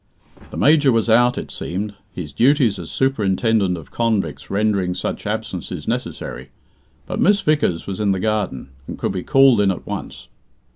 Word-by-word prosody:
The - - -8
Major 145 -2 +4
was 115 -1 +1
out, 120 +2 +4
it - - -5
seemed, 100 +4 -4 0.2
his 85 -7 -7
duties 120 - +3
as 85 - -7
Superintendent 110 -6 +1
of 80 - -12
Convicts 115 -4 -1
rendering 100 -3 0
such - - -4
absences - - -4
necessary; 65 +3 -4 0.6
but - - -4
Miss 205 +1 +4
Vickers 150 - +1
was 95 0 -5
in 105 -2 +2
the 95 - 0
garden, 105 - -2 0.2
and - - -6
could - - -2
be 95 -1 -3
called 135 0 +5
in 100 - +3
at 95 - -3
once. 65 -1 -7
105 Hz, 165 wpm, -20 LUFS, 90-120 Hz, 0.6 s, called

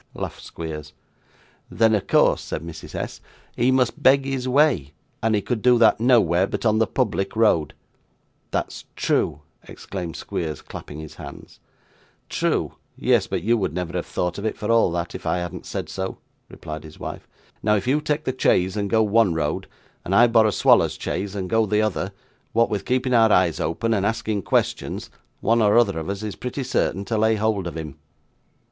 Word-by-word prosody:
laughed - - -5
Squeers. 75 -2 -7 0.8
'Then, 110 -1 +3
of 105 - 0
course,' - - +4
said 80 - -5
Mrs. 85 -1 -9
S., - - -5 0.3
'he 120 +2 +2
must 130 +3 +1
beg 135 0 +5
his 135 -2 -2
way, 130 - +2 0.3
and 110 0 +2
he 105 - 0
could 120 -4 -2
do 125 +1 +5
that, 115 -2 +5
nowhere, 100 -7 +4
but - - -4
on 110 0 +3
the 110 - +3
public 100 -6 -1
road.' 105 -9 +2 0.7
'That's - - -3
true,' 75 - 0 0.3
exclaimed 90 -4 -6
Squeers, 80 -4 -4
clapping 75 - -9
his 80 -1 -9
hands. - - -11 0.7
'True! - - 0 0.2
Yes; - - +2
but - - -3
you 115 +2 +3
would 95 -6 -2
never 90 -2 -3
have - - -3
thought 90 +2 -2
of 100 - -5
it, 110 - -2
for 105 +1 -2
all 115 -6 +4
that, 85 0 -3
if - - -7
I - - +1
hadn't 90 0 -5
said - - -4
so,' 95 0 -4 0.3
replied 75 0 -8
his 80 -1 -13
wife. - - -7 0.3
'Now, 105 0 +3
if 100 - -1
you 140 +4 +2
take 150 0 -1
the 130 - -1
chaise 95 -6 +2
and 100 -1 -1
go 110 0 +3
one 105 -4 +3
road, 75 -2 -2 0.4
and 95 - -1
I 120 - +7
borrow 115 -2 +4
Swallow's 100 - +3
chaise, 100 +3 -3
and 95 -2 -3
go 110 +2 +2
the 105 +1 +2
other, 100 -2 -1 0.4
what 115 +1 +3
with 105 - -2
keeping 130 0 0
our 115 -2 +5
eyes 90 -4 +3
open, 115 +9 -1
and 100 -3 0
asking 110 -1 -1
questions, - - -1 0.3
one 115 +1 +3
or 105 +1 +4
other 100 -8 +3
of 80 - -5
us 100 +1 -4
is 105 -2 -4
pretty 125 +2 -4
certain 100 -5 -1
to 110 0 -1
lay 110 +1 +3
hold 105 -3 0
of 85 - -6
him. 75 -3 -7
105 Hz, 195 wpm, -23 LUFS, 90-115 Hz, 0.8 s, I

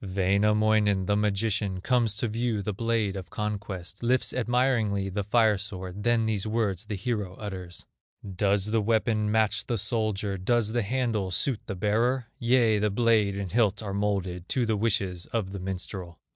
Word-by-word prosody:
Wainamoinen, 100 +1 +2
the 105 - +2
magician, 105 -1 0
Comes 115 0 +1
to 120 - -1
view 115 -1 -1
the 105 - -2
blade 115 -2 0
of 95 -3 -6
conquest, 100 -4 -5
Lifts 125 +1 +1
admiringly 115 -5 +1
the 100 +2 -2
fire 110 -1 +3
sword, 95 -1 -6
Then 115 0 +2
these 110 -2 -1
words 110 -3 -1
the 105 -1 -4
hero 100 -2 -3
utters: 95 -4 -7 0.4
"Does 100 +2 0
the 115 -1 +2
weapon 110 0 +1
match 110 -1 +1
the 120 - 0
soldier, 105 -2 -1
Does 110 +2 +1
the 120 +1 +1
handle 115 -3 -1
suit 110 +6 0
the 95 - -3
bearer? 115 +6 +1
Yea, 115 -3 +3
the 105 +1 +2
blade 105 -2 +2
and 100 -3 -4
hilt 110 -2 +2
are 100 -2 -4
molded 95 -3 -2
To 125 -2 +1
the 110 -1 +1
wishes 100 -5 -1
of 105 -5 -2
the 100 - -5
minstrel." 90 -2 -5
105 Hz, 170 wpm, -27 LUFS, 95-115 Hz, 0.4 s, fire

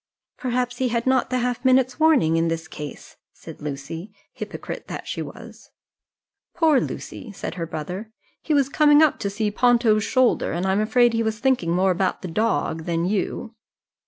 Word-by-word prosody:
"Perhaps 250 -1 -1
he 260 - +2
had 235 -1 -1
not 260 -1 +2
the 255 - 0
half 245 0 -1
minute's 260 0 +3
warning 300 - +4
in 165 0 +2
this 165 -1 -3
case," 150 -2 -9 0.2
said - - -12
Lucy, 150 +6 -6 0.2
hypocrite - - -7
that - - -7
she - - -3
was. - - -10 0.9
"Poor 320 -5 +4
Lucy," 230 - -6
said - - -5
her 170 -2 -4
brother; 180 +8 -6 0.3
"he 310 - 0
was 275 -2 +3
coming 295 +1 +5
up 310 - +2
to 200 - -2
see 210 +1 -1
Ponto's 230 -2 +3
shoulder, 255 +1 +2
and 175 +3 -2
I 190 - +2
am 195 +2 +2
afraid 240 +2 +3
he 230 - +1
was 220 -1 -1
thinking 250 -8 +1
more 185 +2 +3
about 185 +1 -1
the - - -3
dog 165 -4 -1
than 170 -1 0
you." 210 +4 -2
220 Hz, 185 wpm, -23 LUFS, 175-255 Hz, 0.9 s, coming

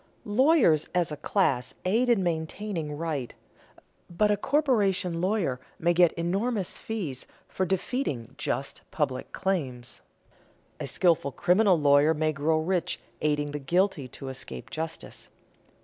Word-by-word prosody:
Lawyers 220 - +4
as 175 -3 +2
a - - -3
class 135 -12 0
aid 230 +7 +2
in 225 -6 +3
maintaining 165 -1 -3
right, 150 -6 -3 0.7
but 210 +5 +2
a - - +4
corporation 200 - +1
lawyer 180 - 0 0.2
may 170 +1 +2
get 175 -1 +5
enormous 195 +4 -1
fees 175 - -4 0.2
for 185 - -2
defeating 175 - -2
just 140 -1 -3
public 140 -5 -2
claims; 135 -11 -3 0.8
a - - -4
skilful 165 -6 +2
criminal 180 +4 +3
lawyer 145 +2 +5
may 155 +1 +1
grow 155 +3 +1
rich 175 +1 -1 0.2
aiding 150 -1 0
the 150 - -4
guilty 175 -1 +1
to 135 +2 -9
escape 130 0 -7
justice. 160 +1 -6
170 Hz, 130 wpm, -27 LUFS, 145-195 Hz, 0.8 s, get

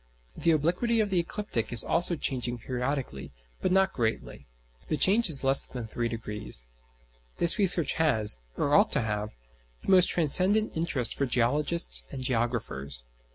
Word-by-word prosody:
The 170 - -1
obliquity 175 +10 +1
of 210 -2 0
the 185 - +2
ecliptic 170 - -4
is 120 -2 +5
also 170 +1 +2
changing 125 -5 -2
periodically, 125 - -5 0.3
but - - -1
not 190 0 +2
greatly: 115 -3 -4 0.4
the 155 - -2
change 200 - +4
is 140 -4 +6
less 135 +1 +3
than 125 -3 -7
three 115 +2 -4
degrees. 105 - -6 0.7
This 170 +4 +2
research 175 -6 +1
has, 110 - 0 0.2
or 145 - -1
ought 205 +6 +4
to 140 - +2
have, 105 - -4 0.5
the - - -1
most 185 -1 +5
transcendent 185 +7 +2
interest 160 -7 -1
for 140 - -2
geologists 125 - +2
and 130 - -6
geographers. 115 - -1
140 Hz, 155 wpm, -27 LUFS, 115-175 Hz, 0.7 s, is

